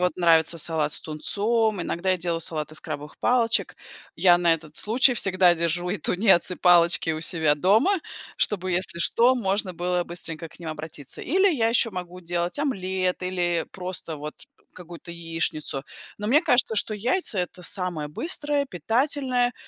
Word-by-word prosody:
вот 180 0 0
нравится 165 -1 +3
салат 155 -2 -1
с - - -1
тунцом, 210 +6 -1
иногда 185 +3 -2
я 185 - +2
делаю 170 -1 -2
салат 155 -2 -4
из 155 - -7
крабовых 150 -1 -7
палочек. 235 -2 +1 0.4
Я 175 -2 +5
на 170 -1 +3
этот 155 -2 -11
случай 245 +4 +3
всегда 185 -4 +4
держу 170 +1 -1
и 200 - -2
тунец, 180 +2 +2
и 180 - -4
палочки 170 -1 +4
у 155 - -4
себя 160 -3 +2
дома, 220 - +3 0.4
чтобы, 185 -3 0
если 175 -1 -2
что, 235 +8 +3
можно 195 -3 -1
было 180 +1 -1
быстренько 165 -1 -7
к - - -18
ним 165 - -6
обратиться. 155 -3 -8
Или 380 +7 +3
я 225 -5 +1
еще 230 0 +2
могу 180 -1 -7
делать 175 +2 -3
омлет 190 -10 -2
или 175 -2 -1
просто, 180 -3 -6
вот, 150 +1 -7 0.4
какую-то 175 -1 -11
яичницу. 165 -4 -3 0.3
Но, 210 - -4
мне 280 +8 +4
кажется, 245 -2 +3
что 215 - 0
яйца- 235 - +1
это 180 0 -4
самое 180 -6 -3
быстрое, 290 - -1
питательное, 245 - 0
180 Hz, 165 wpm, -24 LUFS, 165-220 Hz, 0.4 s, Я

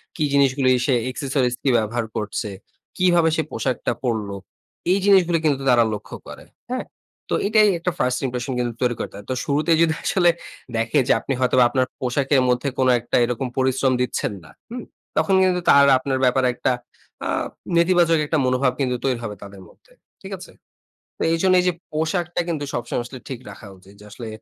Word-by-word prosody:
কি 155 - -1
জিনিসগুলো 135 -1 +3 0.2
সে 135 - +3 0.2
accessories 130 -2 -1
কি 140 - +2
ব্যাপার - - +5
ব্যবহার 115 +2 -2
করছে? 105 +1 -3 0.5
কিভাবে 175 -3 +4
সে 160 - +1
পোশাকটা 130 -3 -1
পড়ল? 110 -5 -1 0.6
এই 190 - +4
জিনিসগুলো 185 -4 +5
কিন্তু 140 -3 +1
তারা 120 -2 +5
লক্ষ্য 105 - -7
করে। - - -10 0.3
হ্যাঁ? - - -2 0.5
তো - - +3
এটাই 215 0 +5
একটা 180 +2 -1
1st 125 0 +1
impression 125 +1 -3
কিন্তু 120 -1 -1
তৈরি 120 -1 +1
করতে - - -5
হয়। 100 - -11
তো - - 0
শুরুতেই 155 +3 +2
যদি 160 -1 +2
আসলে 175 -2 +3 0.5
দেখে 115 +5 +1
যে - - +5
আপনি 135 - -3
হয়তোবা 125 0 +4
আপনার 130 +1 +1
পোশাকের 135 +2 +1
মধ্যে 125 +3 +1
কোন 130 - +2
একটা 120 - -3
এরকম 125 +2 -3
পরিশ্রম 130 0 +2
দিচ্ছেন 125 -4 -1
না। 80 - -15 0.2
হুম? 240 0 -6 0.3
তখন 195 - +3
কিন্তু 180 -1 +2
তার 140 0 +7
আপনার 130 +1 -2
ব্যাপারে 130 +1 +3
একটা 125 - 0 0.6
আ - - -3 0.5
নেতিবাচক 170 -1 +4
একটা 155 +2 0
মনোভাব 130 +1 +2
কিন্তু 130 -2 0
তৈরি 130 -3 0
হবে 105 -2 -5
তাদের 100 -1 -11
মধ্যে। - - -25 0.3
ঠিক - - -9
আছে? - - -12 0.7
তো - - -3
এইজন্য 185 +3 +3
এই - - -2
যে - - +2 0.2
পোশাকটা 170 +3 -1
কিন্তু 155 -4 -2
সবসময় 120 +1 -2
আসলে 130 +2 -9
ঠিক 130 -3 -6
রাখা 110 - -12
উচিত। 95 +2 -18
যে - - -14
আসলে 115 +3 -8
130 Hz, 185 wpm, -22 LUFS, 120-165 Hz, 0.7 s, তার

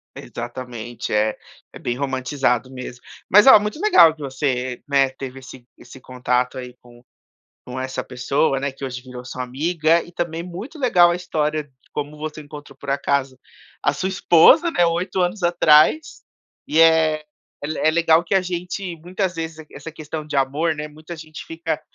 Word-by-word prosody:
Exatamente, 120 -1 -7
é 105 0 +1 0.4
é - - -10
bem 120 - -2
romantizado 130 -1 -1
mesmo. 125 -1 -9 0.3
Mas, 205 +5 +7
olha, 265 -6 +9
muito 210 +8 -4
legal 170 - +6
que 155 - -15
você, 130 -2 -2
né, 135 -2 +3
teve 135 0 -8
esse 130 -1 -13
esse 130 - -14
contato 125 0 -1
aí 125 -1 -7
com 120 0 -18 0.6
com 125 +1 -7
essa 130 0 -3
pessoa, 135 +3 0
né, 140 0 -3
que 135 - -9
hoje 130 -1 -5
virou 125 -1 -10
sua 130 0 -5
amiga, 160 +5 +1
e 175 - -13
também 170 -1 -3
muito 195 - -8
legal 175 -9 +5
a - - -1
história 155 -4 -1
de 145 - -24 0.2
como 150 +1 -4
você 155 0 -6
encontrou, 145 -2 -11
por 140 +1 -7
acaso, 140 -2 -1 0.4
a 145 - +2
sua 185 +6 -2
esposa, 190 - +5
né, 175 - +3
8 175 +3 -1
anos 180 +2 -1
atrás, 170 - +4 0.4
e, 160 - +2
é 160 -2 +4 0.4
é - - -1
le 155 - -4
é 155 - +3
legal 165 0 +3
que 195 - -2
a 190 - +4
gente, 180 0 -4
muitas 180 +2 -3
vezes, 160 -1 -5
e - - -11
q - - -20
essa 165 - -8
questão 155 0 -7
de 150 - -7
amor, 145 +5 +1
né, 150 0 -6
muita 155 +3 -10
gente 155 -1 -10
fica 165 -1 -4
150 Hz, 185 wpm, -21 LUFS, 130-170 Hz, 0.6 s, olha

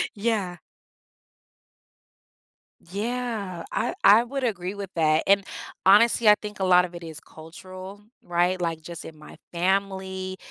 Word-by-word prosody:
Yeah. 200 -5 -1 2.3
Yeah. 215 -4 -3
I - - -1
I 215 +3 +7
would 270 +2 -5
agree 195 -5 -2
with 200 -2 -7
that, 155 -1 +2
and 200 0 +4 0.4
honestly, 220 +3 +6
I 210 - +8
think 210 -1 -8
a 190 - -1
lot 180 -1 +5
of 175 - -11
it 175 0 -9
is 160 -2 -8
cultural, 185 +5 -11 0.2
right? 175 +1 0
Like, 165 -2 -2
just 170 0 -9
in 155 - -11
my 150 - -13 0.2
family, 190 +1 -2
190 Hz, 135 wpm, -25 LUFS, 175-205 Hz, 2.3 s, I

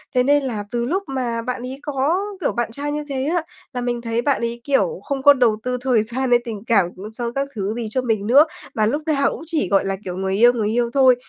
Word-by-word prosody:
Thế 250 - +4
nên 285 +2 +3
là 225 -6 -3
từ 240 -1 -1
lúc 370 +10 -1
mà 245 -4 -2
bạn 250 +1 -4
ấy 255 +2 -6
có, 295 +4 0 0.2
kiểu, - - +1
bạn 240 -2 -2
trai 285 +4 -4
như 300 0 -3
thế 265 -1 -2
á 350 - +2 0.3
là 250 - -3
mình 240 -1 -2
thấy 230 0 -1
bạn 280 0 +1
ấy, 235 0 -3
kiểu, 290 - +1
không 275 -2 -3
có 285 0 +9
đầu 240 -5 +2
tư 250 0 -1
thời 250 -4 +2
gian 250 +4 -2
hay 240 0 +5
tình 215 -4 -6
cảm 200 -6 +4
cũng 205 +4 -8
sau 235 +1 -4
các 275 0 0
thứ 200 0 -2
gì 235 -2 -3
cho 255 - 0
mình 220 -4 -1
nữa 280 +6 +7 0.3
mà 215 - +2
lúc 290 +8 0
nào 290 -3 +2
cũng - - -7
chỉ, 315 - 0
gọi 195 0 +3
là, 195 0 -1
kiểu, 180 -1 -4
người 190 0 -1
yêu, 240 +4 +6
người 215 -3 -1
yêu 235 +1 +1
thôi. 260 -2 +6
245 Hz, 270 wpm, -21 LUFS, 225-275 Hz, 0.3 s, có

